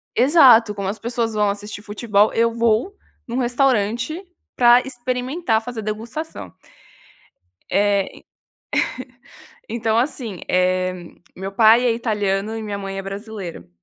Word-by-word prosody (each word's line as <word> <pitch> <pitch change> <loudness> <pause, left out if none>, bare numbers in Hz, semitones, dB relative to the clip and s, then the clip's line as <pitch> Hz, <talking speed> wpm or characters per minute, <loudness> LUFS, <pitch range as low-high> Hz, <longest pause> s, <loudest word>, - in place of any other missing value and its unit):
exato, 245 -5 +6
como 195 -1 -4
as 210 - -3
pessoas 230 0 -2
vão 210 -1 +1
assistir 205 +1 -5
futebol, 210 -1 +1
eu 230 0 +2
vou 230 - +1 0.3
num 240 +2 -3
restaurante 250 - 0 0.3
pra 240 0 +6
experimentar 250 0 -2
fazer 240 -1 -6
degustação. 215 - -6 1.2
É, 200 -1 +2 1.6
então, 225 -1 -1
assim, 235 - -2
eh 185 0 +1 0.4
meu 190 +1 -6
pai 220 +4 +5
é 240 - +4
italiano 210 -2 -1
e 225 - -4
minha 205 -2 -4
mãe 195 -1 -6
é - - -3
brasileira. 195 - -7
220 Hz, 120 wpm, -21 LUFS, 200-240 Hz, 1.6 s, exato